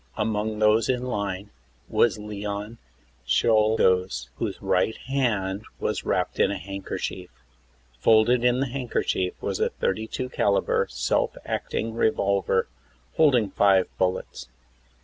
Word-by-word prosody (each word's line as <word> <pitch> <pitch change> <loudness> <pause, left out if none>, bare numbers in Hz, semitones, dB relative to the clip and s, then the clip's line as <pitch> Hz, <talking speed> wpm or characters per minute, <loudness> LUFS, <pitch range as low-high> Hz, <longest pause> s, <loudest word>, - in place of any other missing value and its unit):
Among 110 0 -1
those 105 +1 +3
in 125 -1 0
line 100 -5 -3 0.4
was 120 - +2
Leon 105 +1 -5 0.4
Czolgosz, 95 - +2
whose - - -3
right 110 - +1
hand 110 -8 -1 0.2
was - - -2
wrapped - - -1
in - - +4
a - - -2
handkerchief. 95 -1 -5 0.7
Folded 115 - +4
in 125 +1 +3
the 135 - -1
handkerchief 120 -7 -1
was - - -2
a - - +2
32 110 +5 -3
caliber 100 -5 +1
self 60 +1 0
acting 115 0 -3
revolver 100 -4 +1 0.5
holding 125 -10 +4
five 95 -2 +3
bullets. 90 -8 -2
105 Hz, 115 wpm, -25 LUFS, 95-115 Hz, 0.7 s, in